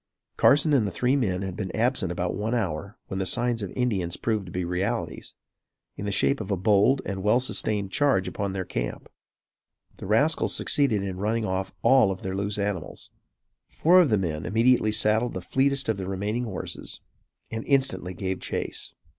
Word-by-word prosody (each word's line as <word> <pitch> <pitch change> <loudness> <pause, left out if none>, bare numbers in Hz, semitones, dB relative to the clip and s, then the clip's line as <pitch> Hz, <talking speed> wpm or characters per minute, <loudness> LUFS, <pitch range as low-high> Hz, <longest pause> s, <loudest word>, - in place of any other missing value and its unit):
Carson 145 +2 +4
and 120 -7 +3
the - - -3
three 125 +8 +1
men 100 -8 0
had 95 -2 -4
been 95 -2 -4
absent 115 -5 +1
about 90 0 -2
one 110 +4 -1
hour 100 -3 -3
when 95 - -4
the 95 - -1
signs 120 +1 0
of 100 - -4
Indians 100 -9 -1
proved 110 -4 -1
to - - -9
be 90 0 -2
realities, 95 +7 -3 0.6
in 100 - -6
the 100 - -1
shape 135 +5 +2
of 100 - -6
a 100 - 0
bold 105 +8 +3
and 95 -1 -3
well 105 +5 +3
sustained 105 -6 -1
charge 135 -10 +2
upon 100 -1 -3
their 95 -1 -3
camp. - - -4 0.9
The - - -8
rascals 140 +10 +2
succeeded 120 -9 +2
in 95 -2 -4
running 110 +2 0
off 95 0 -2
all 130 -6 +5
of 95 -1 -5
their 95 0 -3
loose 100 +2 -2
animals. 100 -5 -4 0.6
Four 180 +3 +5
of 165 - +2
the 105 - +3
men 80 -5 -2
immediately 115 0 +3
saddled 110 +1 +1
the - - -2
fleetest 135 +7 +1
of 110 -3 0
the 95 -1 -5
remaining 105 +5 -2
horses 105 -5 -5 0.5
and 115 0 -4
instantly 135 -10 +1
gave 95 +1 -3
chase. - - -4
105 Hz, 190 wpm, -26 LUFS, 95-120 Hz, 0.9 s, all